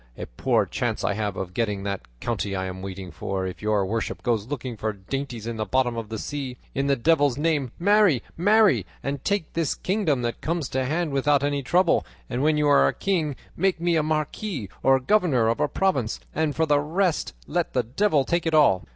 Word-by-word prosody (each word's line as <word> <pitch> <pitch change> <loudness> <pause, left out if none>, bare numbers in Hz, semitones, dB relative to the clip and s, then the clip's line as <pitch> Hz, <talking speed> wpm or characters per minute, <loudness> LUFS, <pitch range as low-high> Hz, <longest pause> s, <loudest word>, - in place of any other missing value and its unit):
A - - -5
poor - - +1
chance - - -2
I - - +1
have 105 -1 -2
of 90 -1 -5
getting 105 -2 -1
that 100 -1 -4
county 105 - -2
I 95 0 -2
am 95 0 -6
waiting 95 -1 -7
for 95 +4 -3
if 95 - -6
your 105 -2 +1
worship 110 +4 -3
goes 115 -3 0
looking 130 -3 -4
for 110 0 -2
dainties 120 +3 -5
in 115 -1 -4
the 110 - -1
bottom 125 -1 +1
of 115 -2 -5
the 110 - -4
sea. 135 +1 -5 0.2
In 135 +1 0
the 140 - +3
devil's 145 -1 +2
name, 145 -5 0
marry, 200 - +4
marry, 200 - +4 0.2
and 140 -1 -3
take 200 -6 -1
this 165 -4 0
kingdom 180 - 0
that 120 0 -3
comes 165 -3 -2
to 130 0 -1
hand 160 +3 -1
without 140 +1 +2
any 145 0 0
trouble, 170 +6 +3 0.3
and 125 +1 -1
when 150 +1 +3
you 150 -1 +2
are 70 - +5
king 165 -8 -1 0.2
make 185 0 +1
me 170 0 +1
a 160 - +3
marquis 155 - -2
or 135 0 +4
governor 135 - +2
of 115 - 0
a 150 - +2
province, 140 - 0
and 155 -2 0
for 160 - +2
the 145 -2 +3
rest 165 +3 0
let 175 +1 -1
the 125 - +2
devil 145 - +1
take 170 +2 0
it 160 - +2
all." 95 - +4
140 Hz, 210 wpm, -25 LUFS, 110-160 Hz, 0.3 s, are